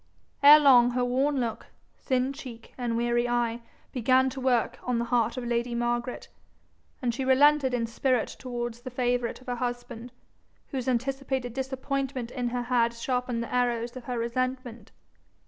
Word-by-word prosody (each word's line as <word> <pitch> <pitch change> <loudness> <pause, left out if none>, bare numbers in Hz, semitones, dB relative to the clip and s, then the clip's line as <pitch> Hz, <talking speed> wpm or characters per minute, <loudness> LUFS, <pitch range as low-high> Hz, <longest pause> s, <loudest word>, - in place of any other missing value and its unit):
Ere 290 +2 +10
long 250 -4 +6
her 245 0 0
worn 270 +3 +1
look, 230 -3 -3 0.3
thin 260 0 -1
cheek, 250 -6 -10
and 240 -2 -2
weary 240 0 +1
eye 240 -1 0 0.3
began 260 +1 +3
to 270 - -7
work 250 -3 +1
on 250 -1 -1
the 235 - -1
heart 235 0 +1
of 250 - -4
lady 235 0 -1
Margaret, 240 +1 -2 0.8
and 240 -1 +1
she 265 +3 -3
relented 270 +1 +4
in 245 -2 0
spirit 245 +1 0
towards 240 -2 -5
the 255 - -7
favourite 245 -1 -1
of - - -17
her 245 -2 -3
husband, 245 -1 -5 0.6
whose 265 -2 -4
anticipated 265 0 -1
disappointment 265 -1 -3
in 250 -2 -2
her 245 0 -2
had 235 -1 +1
sharpened 250 -1 -2
the 235 - -8
arrows 240 -1 0
of 255 -2 -9
her 245 -1 -3
resentment. 240 -1 -3
245 Hz, 165 wpm, -27 LUFS, 235-260 Hz, 0.8 s, Ere